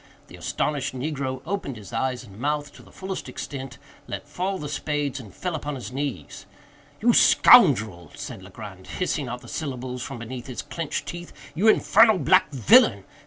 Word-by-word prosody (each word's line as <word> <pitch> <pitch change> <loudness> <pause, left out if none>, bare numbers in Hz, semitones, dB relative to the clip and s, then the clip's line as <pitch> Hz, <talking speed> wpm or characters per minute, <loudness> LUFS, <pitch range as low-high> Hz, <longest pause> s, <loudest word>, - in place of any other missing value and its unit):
The - - -11
astonished 145 -3 -2
negro 130 -1 -3
opened 185 -7 -3
his 105 +1 -11
eyes 125 +1 -1
and 100 -3 -14
mouth 145 +1 -2
to - - -14
the - - -18
fullest 190 0 -6
extent, 135 -3 -7 0.3
let - - -6
fall 190 +2 -2
the 150 - -6
spades, 145 -1 -2
and 110 -6 -11
fell 180 -1 -4
upon 150 -2 -4
his 125 -1 -7
knees. 140 0 -5 0.5
"You 240 +2 +4
scoundrel," 110 - +6
said - - -7
Legrand, 95 0 -11
hissing 155 -6 -1
out 120 +1 -5
the - - -13
syllables 130 -4 -5
from 120 - -6
between 120 +1 -7
his 125 -2 -6
clenched 165 -3 -4
teeth—"you 175 +1 -4
infernal 220 0 +6
black 185 -1 +4
villain! 125 -8 +5
140 Hz, 165 wpm, -25 LUFS, 125-165 Hz, 0.5 s, scoundrel